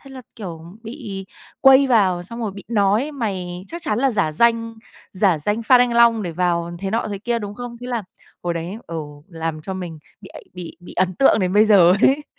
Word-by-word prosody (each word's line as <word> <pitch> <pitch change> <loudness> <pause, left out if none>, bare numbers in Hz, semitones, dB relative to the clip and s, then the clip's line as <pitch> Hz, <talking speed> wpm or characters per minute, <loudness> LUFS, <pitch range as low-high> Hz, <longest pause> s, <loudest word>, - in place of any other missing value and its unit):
Thế 275 - -15
là, 260 -1 -10
kiểu, 175 -7 -7 0.2
bị 220 -6 -7 0.3
quây 270 0 +7
vào, 195 -8 +2
xong 230 +7 -9
rồi 215 -4 -3
bị 200 0 -11
nói: 215 +6 +1
"Mày 185 -8 -4
chắc 340 +1 -7
chắn 280 -10 -1
là 270 +2 +2
giả 200 -9 0
danh, 230 +5 +2 0.4
giả 185 -4 +2
danh 205 +9 -1
fan 250 +2 +5
anh 245 -1 +3
Long 235 -2 +5
để 175 - -3
vào 170 0 0
thế 195 +1 -4
nọ, 225 +2 -1
thế 200 -1 -4
kia, 235 +3 -1
đúng 205 -2 -6
không?" 245 +1 -7
Thế 245 - -7
là 240 -3 -2 0.4
hồi 175 -1 -2
đấy, 170 +4 -5
ừ, 165 - -6 0.3
làm 165 -3 -4
cho 190 - -5
mình 175 -4 -6 0.2
bị 195 - -12
ấ - - -8
bị 180 -2 -8
bị 175 - -12
ấn 185 0 0
tượng 245 +2 +4
đến 185 -1 0
bây 210 +2 +5
giờ 185 -5 +6
ấy! 285 +2 +4
205 Hz, 230 wpm, -21 LUFS, 180-235 Hz, 0.4 s, quây